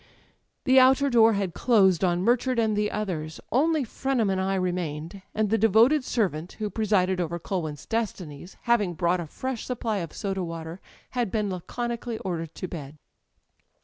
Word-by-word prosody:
The 260 Hz, -1 st, +6 dB
outer 265 Hz, +2 st, +5 dB
door 225 Hz, -1 st, +6 dB
had 195 Hz, -4 st, -1 dB
closed 195 Hz, -6 st, +3 dB
on 175 Hz, -1 st, +2 dB
Murchard 245 Hz, +3 st, +2 dB
and 220 Hz, -2 st, +2 dB
the 210 Hz, 0 st, +1 dB
others; 165 Hz, -7 st, -4 dB
only 305 Hz, +3 st, +2 dB
Frenham 245 Hz, -3 st, 0 dB
and 190 Hz, 0 st, 0 dB
I 195 Hz, +1 st, 0 dB
remained; 175 Hz, -1 st, -3 dB
and 215 Hz, -1 st, 0 dB
the 225 Hz, -, +3 dB
devoted 225 Hz, +7 st, +5 dB
servant 180 Hz, -9 st, -1 dB
who 210 Hz, -2 st, -4 dB
presided 190 Hz, -4 st, +1 dB
over 170 Hz, 0 st, -2 dB
Culwin's 160 Hz, -5 st, -4 dB
destitiies, 185 Hz, -8 st, -4 dB
having 210 Hz, -7 st, +2 dB
brought 175 Hz, +1 st, +1 dB
a 170 Hz, -, -5 dB
fresh 260 Hz, -, -4 dB
supply 230 Hz, -4 st, -2 dB
of 170 Hz, -4 st, -4 dB
soda 195 Hz, -3 st, -3 dB
water, 165 Hz, +1 st, -6 dB, 0.3 s
had 245 Hz, -4 st, -1 dB
been 210 Hz, 0 st, -1 dB
laconi 235 Hz, +6 st, -4 dB
cally 235 Hz, -2 st, -4 dB
ordered 165 Hz, -5 st, -4 dB
to 185 Hz, -, -5 dB
bed. 150 Hz, -4 st, -8 dB
200 Hz, 170 wpm, -26 LUFS, 175-230 Hz, 0.3 s, The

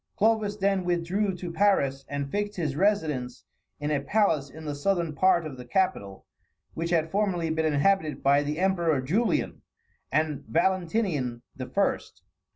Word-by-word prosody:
Clovis 215 Hz, -1 st, +2 dB
then 195 Hz, -2 st, +1 dB
withdrew 180 Hz, +3 st, 0 dB
to 180 Hz, -1 st, -6 dB
Paris, 140 Hz, -9 st, +2 dB
and 140 Hz, -1 st, -4 dB
fixed 205 Hz, 0 st, -2 dB
his 155 Hz, -6 st, -2 dB
residence 155 Hz, -10 st, 0 dB, 0.3 s
in 145 Hz, +1 st, -2 dB
a 145 Hz, -2 st, +1 dB
palace 155 Hz, -4 st, +1 dB
in 160 Hz, +3 st, -11 dB
the 150 Hz, -, -3 dB
southern 170 Hz, +2 st, 0 dB
part 170 Hz, +1 st, +3 dB
of 140 Hz, -4 st, -7 dB
the 125 Hz, -, -8 dB
capital, 125 Hz, -, -1 dB, 0.5 s
which 165 Hz, +1 st, -3 dB
had 160 Hz, -2 st, +1 dB
formerly 185 Hz, -5 st, 0 dB
been 160 Hz, -1 st, +1 dB
inhabited 155 Hz, -1 st, +1 dB
by 140 Hz, +1 st, +4 dB
the 150 Hz, +1 st, -3 dB
emperors 170 Hz, -8 st, +1 dB
Julian 220 Hz, -, 0 dB, 0.5 s
and 155 Hz, -2 st, 0 dB
Valentinian 170 Hz, -, 0 dB
the 130 Hz, -1 st, -6 dB
First. -, -, -1 dB
165 Hz, 155 wpm, -27 LUFS, 145-195 Hz, 0.5 s, by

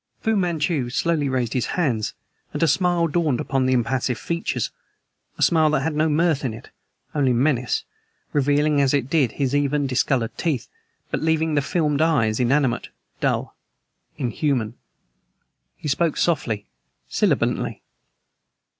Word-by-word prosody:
Fu 220 Hz, 0 st, +1 dB
Manchu 165 Hz, -8 st, 0 dB
slowly 150 Hz, +2 st, 0 dB
raised 125 Hz, -3 st, -1 dB
his 125 Hz, -, 0 dB
hands, 125 Hz, -, 0 dB, 0.4 s
and -, -, -1 dB
a -, -, +4 dB
smile 175 Hz, +2 st, +2 dB
dawned 155 Hz, -5 st, +1 dB
upon 135 Hz, -1 st, 0 dB
the 130 Hz, -, +3 dB
impassive 125 Hz, 0 st, 0 dB
features 170 Hz, +6 st, -2 dB, 0.7 s
a -, -, +1 dB
smile 160 Hz, -2 st, +4 dB
that 150 Hz, -3 st, +1 dB
had 160 Hz, +2 st, -1 dB
no 155 Hz, +1 st, +2 dB
mirth 155 Hz, -1 st, +2 dB
in 120 Hz, -5 st, -2 dB
it, 115 Hz, -, -13 dB, 0.4 s
only 140 Hz, -4 st, +2 dB
menace, 125 Hz, -1 st, +1 dB, 0.5 s
revealing 145 Hz, +1 st, +3 dB
as 140 Hz, 0 st, +3 dB
it 135 Hz, -2 st, -1 dB
did 140 Hz, -9 st, +2 dB
his 140 Hz, -2 st, -1 dB
even, 145 Hz, 0 st, +1 dB
discolored 125 Hz, -2 st, 0 dB
teeth, 155 Hz, -8 st, -1 dB, 0.4 s
but -, -, -1 dB
leaving 160 Hz, 0 st, +1 dB
the 145 Hz, -, +3 dB
filmed 150 Hz, 0 st, 0 dB
eyes 120 Hz, -10 st, +2 dB
inanimate, 130 Hz, 0 st, +1 dB, 0.3 s
dull, -, -, -1 dB, 0.6 s
inhuman. 125 Hz, -3 st, -1 dB, 1.0 s
He -, -, -6 dB
spoke 155 Hz, +3 st, +1 dB
softly, 125 Hz, -, 0 dB, 0.4 s
sibilantly. -, -, 0 dB
145 Hz, 140 wpm, -23 LUFS, 125-160 Hz, 1.0 s, a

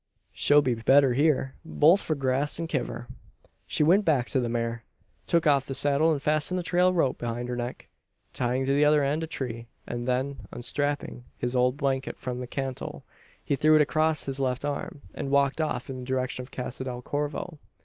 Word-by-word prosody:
She'll 145 Hz, 0 st, +4 dB
be 125 Hz, -, +1 dB
better 130 Hz, +3 st, +4 dB
hyur 135 Hz, -1 st, +2 dB
both 165 Hz, +3 st, +4 dB
for 155 Hz, -, -1 dB
grass 135 Hz, +1 st, 0 dB
and 165 Hz, 0 st, -3 dB
kiver." 120 Hz, -6 st, -3 dB, 0.6 s
He -, -, +1 dB
went 185 Hz, +7 st, +5 dB
back 145 Hz, -9 st, +1 dB
to 135 Hz, -, +1 dB
the 120 Hz, -2 st, -1 dB
mare; 115 Hz, 0 st, -2 dB, 0.4 s
took 170 Hz, -1 st, +2 dB
off 140 Hz, -3 st, +3 dB
the 135 Hz, -, -3 dB
saddle; 145 Hz, +3 st, +3 dB
fastened 150 Hz, +5 st, +1 dB
the 180 Hz, -, -2 dB
trail 180 Hz, +1 st, +3 dB
rope 165 Hz, -8 st, 0 dB
round 120 Hz, +1 st, -3 dB
her 125 Hz, -, -2 dB
neck, 120 Hz, +1 st, -5 dB, 0.5 s
tying 125 Hz, +1 st, 0 dB
the 140 Hz, +2 st, +3 dB
other 150 Hz, 0 st, +4 dB
end 145 Hz, +3 st, 0 dB
to -, -, -2 dB
a -, -, -12 dB
tree; 120 Hz, -6 st, -5 dB, 0.2 s
and 120 Hz, 0 st, -5 dB
then, 130 Hz, -3 st, -2 dB
unstrapping 145 Hz, 0 st, -3 dB
his 125 Hz, +1 st, -2 dB
old 125 Hz, +1 st, +2 dB
blanket 135 Hz, -2 st, -1 dB
from 125 Hz, -1 st, -5 dB
the 125 Hz, -, -5 dB
cantle, 135 Hz, 0 st, -5 dB, 0.4 s
he 140 Hz, -, 0 dB
threw 155 Hz, +3 st, +4 dB
it 155 Hz, -, +6 dB
across 155 Hz, +1 st, +1 dB
his 135 Hz, 0 st, -4 dB
left 130 Hz, 0 st, -1 dB
arm, 145 Hz, 0 st, -4 dB
and 135 Hz, -, -4 dB
walked 140 Hz, +2 st, +2 dB
off 155 Hz, -, -2 dB
in 130 Hz, -2 st, -6 dB
the -, -, -7 dB
direction 130 Hz, 0 st, -2 dB
of 125 Hz, -, -10 dB
Casa 125 Hz, 0 st, -5 dB
del 125 Hz, -1 st, -5 dB
Corvo. 150 Hz, +4 st, -3 dB
135 Hz, 200 wpm, -27 LUFS, 125-150 Hz, 0.6 s, it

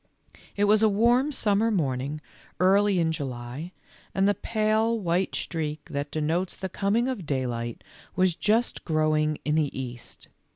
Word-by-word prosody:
It 205 Hz, -, +1 dB
was 210 Hz, +1 st, +4 dB
a 220 Hz, -, +5 dB
warm 240 Hz, +7 st, +3 dB
summer 215 Hz, -4 st, +2 dB
morning 145 Hz, -, -1 dB, 0.4 s
early 195 Hz, +2 st, +4 dB
in 165 Hz, -2 st, +2 dB
July, 135 Hz, +2 st, -5 dB, 0.4 s
and 195 Hz, +1 st, +3 dB
the 205 Hz, -, +4 dB
pale 220 Hz, +2 st, +1 dB
white 180 Hz, 0 st, 0 dB
streak 155 Hz, -2 st, -3 dB
that 145 Hz, 0 st, -3 dB
denotes 160 Hz, +5 st, -1 dB
the 190 Hz, -, -4 dB
coming 205 Hz, +6 st, +1 dB
of 225 Hz, -, -4 dB
daylight 120 Hz, -4 st, -3 dB, 0.3 s
was 185 Hz, -2 st, +2 dB
just 225 Hz, +6 st, +1 dB
growing 155 Hz, -1 st, +1 dB
in 150 Hz, -, +1 dB
the 150 Hz, -4 st, 0 dB
East. 125 Hz, -2 st, -8 dB
175 Hz, 150 wpm, -26 LUFS, 150-210 Hz, 0.4 s, a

